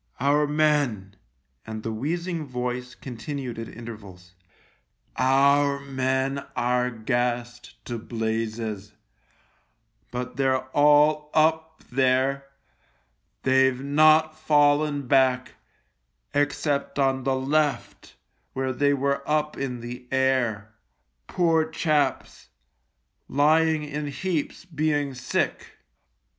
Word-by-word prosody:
" -, -, -30 dB
Our 145 Hz, +3 st, +2 dB
men," 145 Hz, -10 st, +1 dB, 0.5 s
and 110 Hz, -1 st, -7 dB
the 115 Hz, -, -3 dB
wheezing 165 Hz, +7 st, -3 dB
voice 125 Hz, 0 st, -4 dB
continued 130 Hz, -1 st, -6 dB
at 115 Hz, -, -5 dB
intervals, 100 Hz, -6 st, -11 dB, 0.4 s
" -, -, -43 dB
our 140 Hz, +2 st, +3 dB
men 135 Hz, 0 st, -1 dB
are 125 Hz, +1 st, +1 dB
gassed 120 Hz, +1 st, -3 dB
to 120 Hz, -2 st, -4 dB
blazes, 110 Hz, -2 st, -4 dB, 1.2 s
but 125 Hz, 0 st, -5 dB
they're 130 Hz, -1 st, +1 dB
all 150 Hz, +1 st, +4 dB
up 160 Hz, 0 st, +1 dB
there. 130 Hz, +2 st, +1 dB, 1.0 s
They've 130 Hz, -1 st, +3 dB
not 155 Hz, +3 st, +4 dB
fallen 145 Hz, -1 st, +2 dB
back 130 Hz, -1 st, +2 dB, 0.8 s
except 145 Hz, 0 st, -1 dB
on 135 Hz, -1 st, +1 dB
the 135 Hz, 0 st, +1 dB
left, 145 Hz, +2 st, -1 dB, 0.4 s
where 130 Hz, 0 st, -2 dB
they 140 Hz, +2 st, +2 dB
were 140 Hz, +1 st, 0 dB
up 150 Hz, 0 st, 0 dB
in 125 Hz, -3 st, -4 dB
the 125 Hz, +1 st, -8 dB
air. 125 Hz, -5 st, 0 dB, 0.5 s
Poor 165 Hz, -3 st, +2 dB
chaps! 155 Hz, -2 st, -1 dB, 0.8 s
Lying 155 Hz, +2 st, +3 dB
in 150 Hz, 0 st, -4 dB
heaps 155 Hz, +4 st, -3 dB
being 150 Hz, -4 st, -1 dB
sick. 130 Hz, 0 st, -2 dB
135 Hz, 100 wpm, -25 LUFS, 125-150 Hz, 1.2 s, all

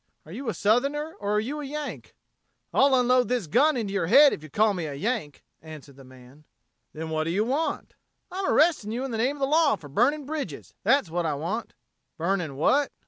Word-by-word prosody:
Are 155 Hz, -, -13 dB
you 240 Hz, +6 st, -5 dB
a -, -, -3 dB
Southerner 280 Hz, +9 st, +1 dB
or 205 Hz, 0 st, -2 dB
are -, -, +3 dB
you 280 Hz, +8 st, -4 dB
a -, -, -6 dB
Yank?" 295 Hz, +1 st, -6 dB, 0.6 s
"I'll 275 Hz, 0 st, +4 dB
unload 250 Hz, 0 st, +3 dB
this 245 Hz, -5 st, -1 dB
gun 285 Hz, -, +3 dB
into 205 Hz, -4 st, -3 dB
your 185 Hz, -5 st, 0 dB
head 285 Hz, -, +7 dB
if -, -, -6 dB
you 155 Hz, -, -11 dB
call 215 Hz, +7 st, +2 dB
me 175 Hz, -4 st, -4 dB
a 145 Hz, -, -6 dB
Yank," 195 Hz, -, -3 dB, 0.2 s
answered 155 Hz, -3 st, -12 dB
the 135 Hz, -, -14 dB
man. 130 Hz, +3 st, -17 dB, 0.5 s
"Then 160 Hz, +1 st, -6 dB
what 155 Hz, 0 st, -1 dB
do -, -, -2 dB
you 200 Hz, +6 st, 0 dB
want?" 280 Hz, +7 st, -2 dB, 0.4 s
"I'm 380 Hz, +1 st, -3 dB
arresting 300 Hz, -9 st, +2 dB
you 240 Hz, +3 st, -3 dB
in 270 Hz, -, -5 dB
the 225 Hz, -, -3 dB
name 260 Hz, +5 st, +1 dB
of 285 Hz, -, -12 dB
the -, -, +3 dB
law 305 Hz, -1 st, +3 dB
for 155 Hz, -7 st, -13 dB
burning 270 Hz, -, +1 dB
bridges. 280 Hz, -, -6 dB
That's 230 Hz, -, +2 dB
what 170 Hz, -1 st, -1 dB
I 150 Hz, -, -1 dB
want." 175 Hz, +11 st, -4 dB, 0.4 s
"Burning 170 Hz, -4 st, -1 dB
what?" 275 Hz, -, +2 dB
220 Hz, 220 wpm, -26 LUFS, -, 0.6 s, head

